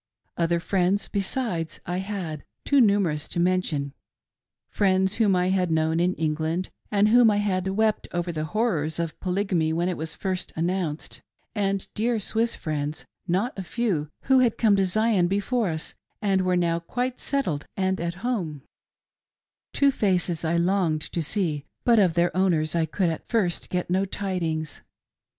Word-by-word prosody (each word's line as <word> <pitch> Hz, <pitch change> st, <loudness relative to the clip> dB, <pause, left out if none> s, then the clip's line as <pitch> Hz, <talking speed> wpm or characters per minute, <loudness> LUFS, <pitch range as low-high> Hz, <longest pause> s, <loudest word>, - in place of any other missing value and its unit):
Other 170 Hz, 0 st, +1 dB
friends, 190 Hz, +3 st, +1 dB
be^es, 195 Hz, -5 st, -1 dB
I 175 Hz, +1 st, -2 dB
had, 190 Hz, -6 st, -4 dB, 0.2 s
too 280 Hz, -2 st, +4 dB
numerous 200 Hz, -9 st, +2 dB
to -, -, -4 dB
mention 170 Hz, -6 st, 0 dB, 0.4 s
— -, -, -67 dB, 0.3 s
friends 190 Hz, -1 st, +2 dB
whom 210 Hz, -4 st, +3 dB
I 180 Hz, 0 st, +2 dB
had 185 Hz, -2 st, +1 dB
known 160 Hz, 0 st, +1 dB
in 180 Hz, +2 st, +2 dB
England, 160 Hz, +3 st, -1 dB, 0.2 s
with 205 Hz, 0 st, +4 dB
whom 240 Hz, 0 st, +6 dB
I 205 Hz, -, +2 dB
had 190 Hz, -3 st, 0 dB
wept 215 Hz, +2 st, +1 dB
over 175 Hz, 0 st, -2 dB
the 155 Hz, -2 st, -3 dB
horrors 160 Hz, -5 st, 0 dB
of 165 Hz, -2 st, -3 dB
Polygamy 180 Hz, -4 st, 0 dB
when 170 Hz, +2 st, 0 dB
it 180 Hz, -, -2 dB
was 160 Hz, +1 st, -5 dB
first 185 Hz, -2 st, -3 dB
an 165 Hz, +2 st, 0 dB
nounced; 175 Hz, -5 st, -3 dB, 0.3 s
and 195 Hz, -3 st, -1 dB
dear 230 Hz, +1 st, 0 dB
Swiss 225 Hz, +3 st, 0 dB
friends, 150 Hz, -1 st, -3 dB, 0.2 s
not 190 Hz, +8 st, 0 dB
a -, -, -1 dB
few, 185 Hz, -7 st, -1 dB
who 265 Hz, -1 st, +4 dB
had 245 Hz, -3 st, +2 dB
come 215 Hz, -3 st, +4 dB
to 195 Hz, -, +3 dB
Zion 210 Hz, -1 st, +2 dB
before 205 Hz, +3 st, 0 dB
us 160 Hz, -1 st, -4 dB, 0.3 s
and 195 Hz, -3 st, +2 dB
were 180 Hz, -1 st, +1 dB
now 170 Hz, -1 st, +1 dB
quite 250 Hz, +8 st, -3 dB
settled 185 Hz, -, -1 dB
and 190 Hz, -1 st, 0 dB
at 170 Hz, 0 st, -2 dB
home; 170 Hz, -, -2 dB, 1.1 s
Two 280 Hz, -1 st, +3 dB
faces 180 Hz, -8 st, 0 dB
I 165 Hz, +1 st, +1 dB
longed 170 Hz, -3 st, +1 dB
to 170 Hz, -, 0 dB
see, 160 Hz, -3 st, -1 dB, 0.2 s
but 235 Hz, -2 st, +5 dB
of 180 Hz, -5 st, +3 dB
their 175 Hz, 0 st, +2 dB
owners 165 Hz, -5 st, +2 dB
I 165 Hz, -1 st, +1 dB
could 180 Hz, -2 st, 0 dB
at 160 Hz, -, -7 dB
first 200 Hz, -8 st, 0 dB
get 180 Hz, -1 st, -1 dB
no 190 Hz, +2 st, +2 dB
tidings. 170 Hz, -6 st, -3 dB
185 Hz, 170 wpm, -25 LUFS, 165-205 Hz, 1.1 s, whom